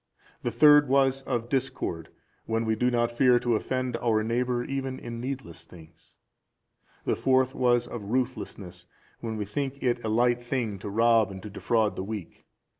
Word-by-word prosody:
The - - -1
third 145 +4 +6
was 135 0 +3
of 120 -1 -1
discord, 120 - -2 0.4
when 115 0 0
we 110 0 +1
do 125 +3 +1
not 120 -1 +1
fear 125 0 +5
to 120 0 0
offend 130 +2 -2
our 110 -2 +1
neighbour 120 +2 0
even 135 0 -3
in 115 0 -7
needless 130 -10 -6
things. 80 -1 -17 0.9
The - - +1
fourth 130 0 +2
was 120 -1 +2
of 120 -2 -7
ruthlessness 105 -8 -3 0.3
when 110 -2 -4
we 105 - -2
think 140 +6 -4
it 120 -1 0
a 110 - -2
light 120 +2 +2
thing 120 -5 -2
to 100 - -6
rob 115 0 +3
and 95 -1 -9
to 105 - -8
defraud 110 0 0
the 95 - -4
weak. 105 -3 -7
120 Hz, 175 wpm, -27 LUFS, 110-130 Hz, 0.9 s, third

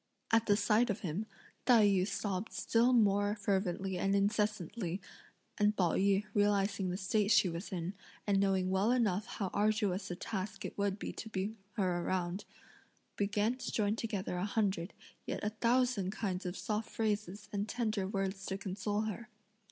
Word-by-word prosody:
At 225 0 +4
the 205 -1 +4
sight 215 +4 +3
of 205 - -2
him, 185 +4 -3 0.4
Tai 235 -4 +7
yü 195 -2 +3
sobbed 200 0 -3
still 235 +2 +3
more 205 -3 +3
fervently 195 -2 -1
and 195 +2 +2
incessantly, 200 -2 0 0.6
and 210 0 +3
Pao 175 -3 +3
yü 200 +1 +2
realising 200 -2 +2
the 180 - -2
state 200 +1 +1
she 205 -3 +6
was 170 +4 -5
in, 180 0 -3 0.3
and 200 -2 +3
knowing 190 -2 +2
well 190 +4 +2
enough 215 -4 +1
how 195 -6 -3
arduous 210 -2 +1
a 175 - -3
task 195 +2 -4
it - - -5
would 200 -1 0
be - - -4
to 225 - -7
bring 210 +2 -3 0.2
her 180 -4 0
round, 185 +2 -1 0.7
began 210 +3 +1
to - - -4
join 210 -1 +1
together 205 -6 -3
a 180 - 0
hundred, 200 -4 0 0.3
yea - - -1
a 210 - +1
thousand 235 -3 +2
kinds 190 -2 -3
of 180 - -4
soft 215 -1 -2
phrases 210 -2 -2
and 205 +1 -1
tender 215 -4 -1
words 195 -1 -2
to 190 - -2
console 200 +2 -2
her. 220 +2 -4
200 Hz, 170 wpm, -34 LUFS, 190-215 Hz, 0.7 s, Tai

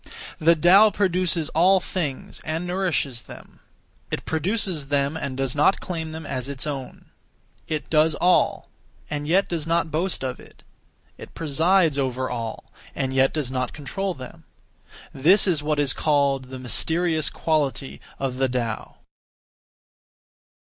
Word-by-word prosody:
(The 165 +2 +5
Tao) 185 +7 +6
produces 180 -5 +1
(all 185 +4 +4
things) 160 -7 -4
and 160 +2 -3
nourishes 175 -9 -1
them; - - -14 0.5
it - - -4
produces 170 -2 0
them 140 +1 0
and 140 -5 -4
does 135 -2 -1
not 150 +6 +3
claim 160 -3 -5
them 160 0 -7
as 130 -1 -4
its 140 0 -4
own; 140 -4 -6 0.6
it 155 -1 -3
does 155 0 +3
all, 180 0 +2 0.4
and 145 0 -3
yet 190 +5 +3
does 165 -3 -3
not 165 -1 +1
boast 170 +1 -1
of 130 -1 -3
it; - - -17 0.6
it - - -11
presides 165 0 +2
over 130 -1 -1
all, 115 -2 -5 0.2
and 130 0 -2
yet 135 0 +3
does 145 -5 -3
not 130 -1 -2
control 185 +6 -4
them. 130 -1 -11 0.7
This 180 +9 +5
is 170 -6 +1
what 150 0 -1
is 145 -2 +2
called 140 -3 +1
'The 130 +1 -8
mysterious 160 - 0
Quality' 145 -4 -1 0.2
(of 130 -2 -3
the 135 0 +1
Tao). 120 -3 -3
150 Hz, 145 wpm, -24 LUFS, 135-170 Hz, 0.7 s, Tao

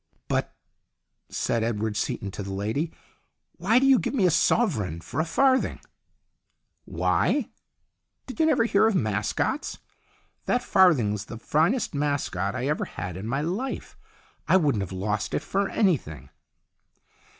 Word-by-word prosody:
"But," - - -1 0.7
said 115 -1 -1
Edward 110 -1 -1
Seaton 100 -1 -2
to 100 - -6
the 100 0 -5
lady, 110 - -2 0.7
"why 205 +7 +3
do 265 - +4
you 270 -2 +6
give - - -2
me 205 -8 +3
a 180 - +4
sovereign 115 - +1
for 85 - -6
a 160 - +2
farthing? 260 +9 +2 0.4
" - - -52 0.2
" - - -50
Why? - - 0 0.7
Did 260 - -9
you 320 - +4
never 290 -7 +3
hear 225 -1 +3
of 225 - +1
mascots? 110 - -1 0.7
That 245 0 +1
farthing's 125 - +3
the 115 - -8
finest 160 - +1
mascot 140 -9 -1
I 130 0 -2
ever 150 - 0
had 90 -3 -6
in 95 +4 -6
my 135 +4 -1
life. 195 - -4 0.5
I - - +6
wouldn't 145 - +1
have 95 - -5
lost 105 +3 -2
it - - -1
for 195 0 -1
anything." 80 - 0
140 Hz, 150 wpm, -26 LUFS, -, 0.7 s, you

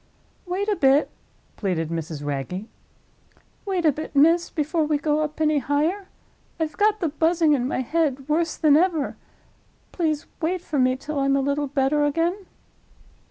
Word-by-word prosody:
"Wait 380 +3 -2
a 420 - +1
bit," 275 -2 +3 0.5
pleaded 175 -6 -1
Mrs. 160 -3 -5
Wragge. 145 +8 -4 1.0
"Wait 370 -3 -1
a 310 - +6
bit, 300 +1 -7
miss, 330 +4 +4
before 315 +1 -1
we 300 0 +1
go 295 +1 0
up 305 0 -4
any 305 -1 +2
higher. 310 +9 -1 0.5
I've 310 -2 -2
got 420 +2 +2
the 335 - +1
Buzzing 320 +1 +2
in 255 -3 0
my 260 - -1
head 280 -1 -1
worse 330 +1 0
than 300 -2 +4
ever. 325 -3 +1 0.8
Please 310 -4 -1 0.2
wait 350 +3 -1
for 305 -5 -3
me 255 0 +3
till 290 +2 -5
I'm 275 0 +2
a - - +2
little 280 +1 0
better 280 +2 +1
again." 335 +6 0
300 Hz, 160 wpm, -23 LUFS, 275-330 Hz, 1.0 s, a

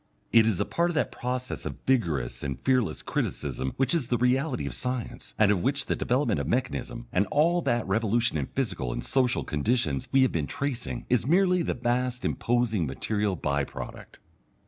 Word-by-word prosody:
It 115 -1 +6
is 105 -6 +1
a - - +1
part 170 +1 +1
of 175 - -3
that 150 - +1
process 125 +1 -3
of - - -5
vigorous 75 - 0
and 70 -2 -4
fearless 130 -5 +1
criticism 65 - -2
which 135 +4 +1
is 155 -8 0
the 120 - +1
reality 125 +3 +1
of - - -4
science, 125 -2 -4
and 105 -1 +5
of 95 -4 +1
which 140 +3 0
the - - 0
development 120 - +1
of 70 - -2
mechanism 80 - -2
and 95 +2 +2
all 170 - +3
that 120 -6 0
revolution 115 -2 +1
in 70 -4 -1
physical 95 - -2
and - - -4
social 130 -2 +1
conditions 75 - 0
we 135 -1 +5
have 130 - +2
been 75 -4 -1
tracing, 125 -3 -3
is 125 0 +1
merely 180 +2 +4
the - - -1
vast 125 +1 -1
imposing 115 -8 +1
material 105 +8 -1
bye 70 -3 0
product. - - -8
120 Hz, 190 wpm, -27 LUFS, 90-130 Hz, -, It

